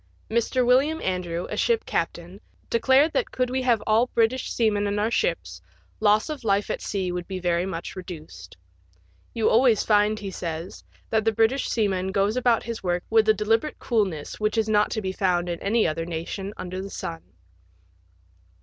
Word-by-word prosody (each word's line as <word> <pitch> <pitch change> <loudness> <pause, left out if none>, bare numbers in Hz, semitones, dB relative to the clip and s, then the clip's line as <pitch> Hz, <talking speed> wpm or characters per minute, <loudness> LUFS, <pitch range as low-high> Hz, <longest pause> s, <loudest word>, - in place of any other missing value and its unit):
Mr. 235 +2 +1
William 275 +6 +3
Andrew, 180 -2 -2
a - - -2
ship 465 -1 +1
captain, 175 +4 -3 0.3
declared 265 +6 +4
that - - 0
could 250 -1 -1
we 260 0 0
have 240 -4 +2
all 225 +3 +3
British 235 +3 +1
seamen 210 -3 +1
in 205 0 -1
our 215 +2 0
ships, - - -1 0.4
loss 210 0 +3
of 300 -5 -6
life 200 -1 +1
at - - -3
sea 190 -3 -2
would 175 0 -4
be 190 - -4
very 175 0 0
much 170 -3 -5
reduced. 155 - -10 0.8
You 225 -2 +1
always 235 -2 +4
find, 210 0 +3
he 200 -2 -6
says, 165 0 -6 0.3
that 220 -1 +2
the 225 - +2
British 225 +5 +1
seaman 190 -4 0
goes 200 +3 +1
about 245 -2 +2
his 230 -1 -5
work 175 -1 -1
with 220 -1 +4
a - - +7
delibe 220 +2 +2
rate 305 - -6
coolness 195 - -2
which 215 +1 0
is 220 -1 +2
not 210 -1 +3
to 220 - -3
be 190 - -1
found 180 -2 0
in 170 -1 -4
any 220 +3 +2
other 165 +1 -2
nation 175 +4 -4
under 185 +1 -5
the 195 - -7
sun. 165 -4 -6
210 Hz, 185 wpm, -25 LUFS, 180-230 Hz, 0.8 s, a